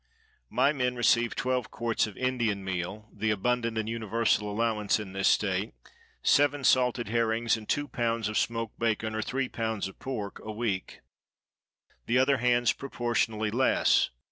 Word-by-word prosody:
—My 145 - +3
men 125 -3 -1
receive 120 -1 +2
twelve 125 -2 -1
quarts 115 -2 0
of 105 - -11
Indian 120 -6 0
meal 95 +3 -4
(the 110 - -1
abundant 115 +2 0
and 110 -1 -1
universal 110 -1 0
allowance 110 -1 +1
in 100 -3 -7
this 95 0 +1
state), 95 - +1 0.5
seven 145 0 +3
salted 125 -3 +3
herrings, 115 0 +1
and 110 -1 -10
two 145 0 0
pounds 115 -2 -1
of 110 - -4
smoked 115 -1 -1
bacon 110 -1 0
or 110 - -1
three 130 +4 -2
pounds 110 -4 -2
of 95 - -13
pork, 110 -7 -5
a 110 - -5
week; 105 -4 -3 1.1
the 120 - +2
other 135 +2 +4
hands 120 0 +3
proportionally 115 -4 -1
less. 130 +4 +3
115 Hz, 155 wpm, -28 LUFS, 105-125 Hz, 1.1 s, other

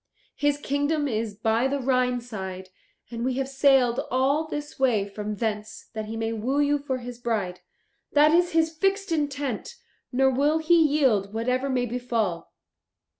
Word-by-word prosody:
His 290 0 +1
kingdom 290 +1 0
is 220 -4 -2
by 225 +4 +1
the 280 +1 -1
Rhine 250 -1 +1
side, 190 -5 -7 0.4
and 235 0 -4
we 255 0 0
have 270 0 -1
sailed 270 -3 +3
all 275 +5 +1
this 295 -2 -6
way 230 -7 +2
from 210 +1 -5
thence 215 0 -4
that 220 -1 -4
he 225 +1 -6
may 225 0 -2
woo 250 +6 -1
you 290 0 +2
for 275 -2 -3
his 245 -1 -8
bride. 210 -7 -2 0.5
That 295 +1 +6
is 345 +1 +3
his 320 -1 +3
fixed 390 +2 0
intent, 285 - -2 0.4
nor 265 +1 +3
will 290 +4 +2
he 320 +2 +2
yield 260 -10 +2
whatever 250 +4 0
may 250 -2 +1
befall. 230 -7 -2
255 Hz, 165 wpm, -25 LUFS, 225-290 Hz, 0.5 s, That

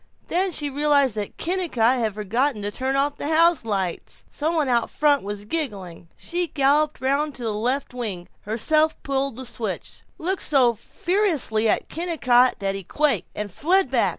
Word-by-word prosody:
Then 370 +2 +1
she 295 -3 -1
realized 285 -3 +2
that 210 -1 -5
Kennicott 300 -9 +1
had 220 -3 -1
forgotten 215 +3 -1
to 205 - -2
turn 265 +4 -2
off 285 +1 0
the - - -4
houselights. 235 - +1
Some 315 +3 -1
one 305 -4 +1
out 240 -2 +1
front 290 -2 +2
was 205 0 -6
giggling. 200 - -4
She 350 0 -2
galloped 295 +1 +1
round 280 +3 0
to 245 - -7
the 220 -2 -1
left 250 +6 -1
wing, 205 -8 -5
herself 305 +9 +1
pulled 275 -2 -1
the 260 +2 -7
switch, 220 -5 -5 0.2
looked 370 +3 -2
so 260 -5 +4
ferociously 295 - 0
at - - 0
Kennicott 255 -8 +2
that 195 -1 -2
he 195 0 -6
quaked, 275 - 0
and 210 -1 -4
fled 345 - +2
back. 245 -3 +3
265 Hz, 170 wpm, -23 LUFS, 220-305 Hz, 0.2 s, so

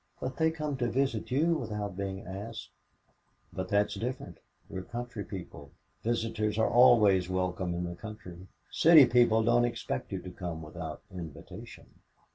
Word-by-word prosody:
"But 130 0 -4
they 160 0 +3
come 150 -3 -3
to 120 -2 0
visit 130 -2 -1
you 155 +7 +2
without 105 - -4
being 95 0 -4
asked." 100 +5 -7 0.8
"But 95 0 -4
that's 105 0 +2
different. 125 +3 -5 0.3
We - - -6
are - - -5
country 120 +2 -6
people. 75 -8 -9 0.3
Visitors 110 -2 -1
are 110 - +2
always 105 -7 +6
welcome 90 -1 -1
in 90 - -2
the 85 0 -4
country. 95 -3 -10 0.2
City 160 -4 +8
people 120 -2 +4
don't 120 +2 +4
expect 120 -2 -3
you 95 - -2
to 90 - -7
come 85 -3 -6
without 80 0 -7
invitation." 85 -6 -10
105 Hz, 155 wpm, -30 LUFS, 90-120 Hz, 0.8 s, City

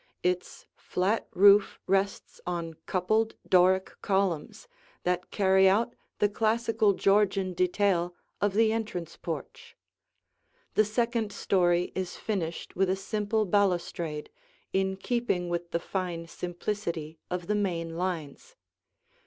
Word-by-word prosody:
Its 180 0 -2
flat 195 +5 -1
roof 200 +2 +5
rests 195 +1 -1
on 170 -2 -3
coupled 215 +5 +1
Doric 185 0 +4
columns 190 - -1 0.4
that 180 0 -1
carry 190 -1 +4
out 230 +5 +2 0.2
the 205 - +3
classical 220 0 +2
Georgian 195 -1 +2
detail 180 -1 +1 0.3
of 205 -1 +1
the 220 0 +4
entrance 180 -7 -4
porch; - - -7 1.0
the 215 - +4
second 230 0 0
story 175 -3 +2
is 185 -1 -3
finished 175 -6 -3
with 190 0 +2
a 190 - +2
simple 210 +2 -1
balustrade, 175 -5 0 0.4
in 190 0 +1
keeping 195 -5 -1
with 175 0 -3
the 170 - -1
fine 175 -2 -3
simplicity 170 -3 -4
of 180 -1 -3
the 210 - 0
main 170 -5 -1
lines. 180 - -4
190 Hz, 120 wpm, -28 LUFS, 175-210 Hz, 1.0 s, roof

